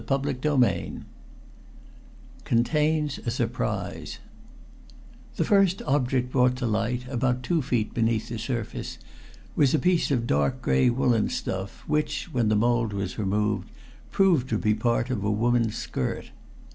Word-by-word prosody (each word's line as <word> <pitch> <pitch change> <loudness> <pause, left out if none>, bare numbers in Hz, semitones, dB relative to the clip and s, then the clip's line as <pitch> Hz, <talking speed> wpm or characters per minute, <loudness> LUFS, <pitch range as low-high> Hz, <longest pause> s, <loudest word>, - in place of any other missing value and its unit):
CHAPTER 140 +1 +1 0.2
VII 125 -3 +1 1.4
CONTAINS 150 +5 +1
A - - -2
SURPRISE 110 - -3 1.2
The - - 0
first 195 -3 +3
object 130 -2 0
brought 125 -1 +3
to 125 -1 -3
light, 120 +3 -1
about 125 -1 -1
two 165 +4 +1
feet 120 -5 -1
beneath 115 -1 0
the 115 -1 -4
surface, 120 -2 -4 0.6
was 140 0 +4
a - - +4
piece 180 +1 +2
of 125 -5 +1
dark 70 -7 +1
gray 65 - +3
woolen 120 -3 +2
stuff 95 +1 -4
which, 150 +2 -1
when 115 -3 +2
the 110 - +3
mold 115 0 +1
was 100 -1 -4
removed, 105 +1 0 0.4
proved 175 -10 +3
to 110 - +1
be 105 0 +2
part 120 +3 0
of 105 -6 -2
a 105 - 0
woman's 115 +1 +1
skirt. - - -4
120 Hz, 140 wpm, -26 LUFS, 110-135 Hz, 1.4 s, was